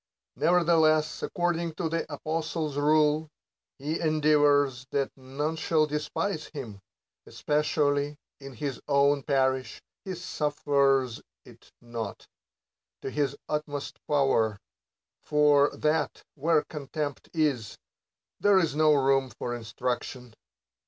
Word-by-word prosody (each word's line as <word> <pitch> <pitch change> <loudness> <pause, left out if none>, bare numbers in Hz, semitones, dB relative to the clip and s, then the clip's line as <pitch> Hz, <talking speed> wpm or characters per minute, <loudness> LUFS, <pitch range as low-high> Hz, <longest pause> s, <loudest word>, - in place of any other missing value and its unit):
Nevertheless, 160 -2 +3
according 170 -1 -1
to 165 - -2
the 165 -1 -3
apostle's 155 0 -3
rule, 150 +1 +3 0.5
he 150 +4 -3
endeavors 145 -4 +3
that 140 -1 -1
none 140 +4 -3
shall 155 -1 +2
despise 150 +3 -3
him; 115 -10 -8 0.5
especially 145 -1 0 0.2
in 135 -1 -9
his 135 +1 -4
own 140 0 +3
parish 130 -2 0 0.2
he 190 -1 -5
suf 150 -4 -3
fers 135 -4 +2 0.2
it - - -17
not, 115 -3 -6 0.8
to 135 - -4
his 145 -2 0
utmost 150 -2 -4
power, 135 -8 +2 0.6
for 145 -1 +4
that, 155 0 0
where 155 +1 +2
contempt 145 -1 -5
is, 145 - -1 0.6
there 205 -1 +5
is 165 -6 +1
no 155 -1 +5
room 135 -1 +2
for 120 +1 -5
instruction. 125 +1 -4
145 Hz, 110 wpm, -28 LUFS, 135-155 Hz, 0.8 s, there